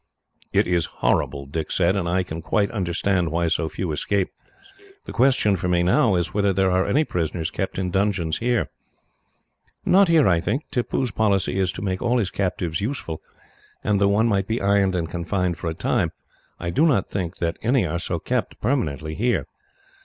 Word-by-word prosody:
"It - - +3
is 85 -3 +1 0.2
horrible," 70 -1 +1
Dick 75 +3 -4
said, 90 +1 +2
"and 90 -4 -1
I 90 +2 +1
can 80 -1 -6
quite 100 +4 0
understand 90 -2 0
why 85 +1 +1
so 80 0 0
few 90 0 -3
escape. 95 +5 0 0.7
The - - -7
question 125 -5 +3
for 90 0 -2
me, 90 -1 +2
now, 95 +3 +3
is 85 -1 -1
whether 100 -1 +2
there 95 0 +2
are 95 +1 +2
any 150 +4 +3
prisoners 85 - -2
kept 95 - -3
in 90 -1 -1
dungeons 95 -4 0
here." 120 -1 0 1.1
"Not 195 +1 +5
here, 165 -3 +5
I 85 -3 +4
think. 135 - -1
Tippoo's 125 -1 -1
policy 100 -2 +1
is 95 -2 +1
to - - -6
make 95 -2 -2
all 120 0 +2
his 105 -6 0
captives 90 -2 -2
useful, 105 - -4 0.6
and 100 -1 +1
though 100 - +5
one 105 +3 +3
might 100 -3 +1
be 115 +2 -1
ironed 100 -1 +2
and 85 -2 -1
confined 85 0 -2
for 85 - -2
a 80 - -4
time, - - 0 0.5
I 85 0 -3
do 155 - +3
not 125 -11 +2
think 95 -2 -4
that 85 -1 -2
any 120 -1 +2
are 85 +1 -2
so - - -2
kept, - - -2
permanently, 80 - -1
here. 120 +8 0
95 Hz, 190 wpm, -23 LUFS, 85-105 Hz, 1.1 s, Not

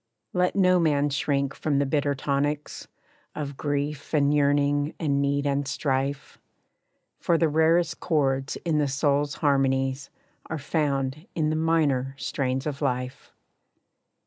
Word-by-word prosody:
Let 180 0 +1
no 185 -2 +4
man 145 -3 +2
shrink 140 -1 0
from 150 -3 -1
the 140 - +2
bitter 145 0 0
tonics 145 +2 -2 0.5
Of 145 -2 -5
grief, 145 +1 -3
and 145 -1 +3
yearning, 145 0 +2
and 140 -4 +1
need, 140 0 0
and 140 0 0
strife, 140 0 -2 0.8
For 170 - +2
the 165 - +3
rarest 160 +3 +2
chords 135 -4 0
in 160 -3 +1
the 145 - +2
soul's 145 +1 0
harmonies, 135 -1 +1 0.4
Are 160 - -3
found 140 +1 -2
in 155 -2 +1
the - - 0
minor 150 -5 +1
strains 130 -1 -2
of 145 -1 -4
life. 125 -2 -3
145 Hz, 135 wpm, -26 LUFS, 140-155 Hz, 0.8 s, no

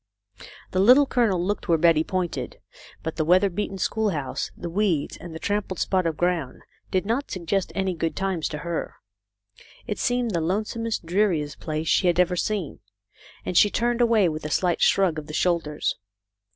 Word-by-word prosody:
The 185 - 0
Little 250 +9 +7
Colonel 230 -9 +1
looked 205 +2 -2
where 165 - +5
Betty 160 -1 +4
pointed, 185 0 -3 0.4
but 160 - -4
the 160 - +1
weather 185 +4 +4
beaten 195 +1 -3
schoolhouse, 190 -9 -1
the 175 - -5
weeds, 175 -4 0
and 170 -2 -10
the - - -6
trampled 205 0 -2
spot 185 0 +1
of 160 -2 -2
ground 175 -7 -1 0.3
did 185 0 0
not 235 +7 -1
suggest 185 +1 -2
any 190 -1 0
good 165 -1 -2
times 190 -4 -1
to 150 - -5
her. 170 -1 -3 0.9
It 210 -4 -4
seemed 245 -1 0
the 170 -4 0
lonesomest, 215 +4 -2
dreari 180 -2 +2
est 145 -1 -9
place 155 +1 -3
she 180 - +3
had 175 0 +2
ever 180 0 +3
seen, 195 -2 -2 0.7
and 180 - -3
she 205 - +6
turned 240 +3 0
away 230 -5 +4
with 155 -1 -4
a 150 - -4
slight 175 +2 +1
shrug 180 -5 +3
of 150 - -10
the 155 - -6
shoulders. 165 -4 0
180 Hz, 180 wpm, -24 LUFS, 165-205 Hz, 0.9 s, Little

